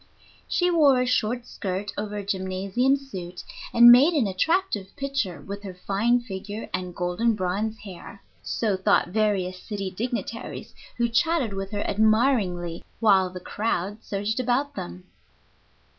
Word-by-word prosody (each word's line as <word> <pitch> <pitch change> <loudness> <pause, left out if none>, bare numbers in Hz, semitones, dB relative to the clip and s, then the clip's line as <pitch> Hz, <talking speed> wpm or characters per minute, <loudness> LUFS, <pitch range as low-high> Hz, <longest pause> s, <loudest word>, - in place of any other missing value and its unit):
She 355 0 +2
wore 290 -6 +5
a 250 - +2
short 240 -1 0
skirt 195 -3 -4
over 210 0 -4
a 205 - -5
gymnasium 195 +7 0
suit, 185 -10 -8 0.3
and 240 0 +9
made 280 +8 +7
an 275 -7 +3
attractive 210 - 0
picture 275 - -2
with 200 +6 -7
her 195 -3 -8
fine 225 +7 +1
figure 205 0 -6
and 180 -1 -3
golden 180 +6 0
bronze 205 +4 -2
hair. 200 0 -11 0.2
So 215 -4 -1
thought 185 -1 +2
various 190 -3 0
city 195 -3 -4
dignitaries, 230 +2 -5 0.2
who 235 0 +2
chatted 255 -1 +1
with 195 0 -4
her 205 -1 -3
admiringly 215 -6 +1 0.2
while 195 -4 +4
the 180 0 -8
crowd 205 +1 -3
surged 205 +4 -2
about 255 +4 0
them. 90 - -7
210 Hz, 145 wpm, -25 LUFS, 190-240 Hz, 0.3 s, and